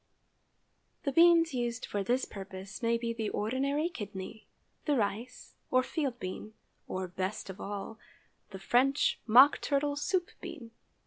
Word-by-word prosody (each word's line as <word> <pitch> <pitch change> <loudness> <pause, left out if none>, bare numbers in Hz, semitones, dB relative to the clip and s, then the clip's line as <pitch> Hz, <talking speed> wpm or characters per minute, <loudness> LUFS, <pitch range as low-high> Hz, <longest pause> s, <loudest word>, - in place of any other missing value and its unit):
_) - - -45
✠ - - -41
The 280 - 0
beans 335 0 +6
used 240 -1 -2
for 200 -1 -2
this 250 +6 +1
purpose 195 +2 -8
may 230 0 +2
be 230 0 -2
the 225 -2 -2
ordinary 275 +8 0
kidney, 205 - -7 0.4
the 295 - +2
rice 230 +2 -3 0.2
or 255 0 +3
field 270 -5 -2
bean, 185 +4 -6 0.3
or, 185 0 -3
best 185 +2 -4
of 190 - -11
all, 205 +2 -6 0.5
the 195 - -8
French 260 +8 +2
mock 255 +6 +7
turtle 285 0 0
soup 350 +5 -1
bean. 250 -9 -8
235 Hz, 150 wpm, -31 LUFS, 205-280 Hz, 0.5 s, mock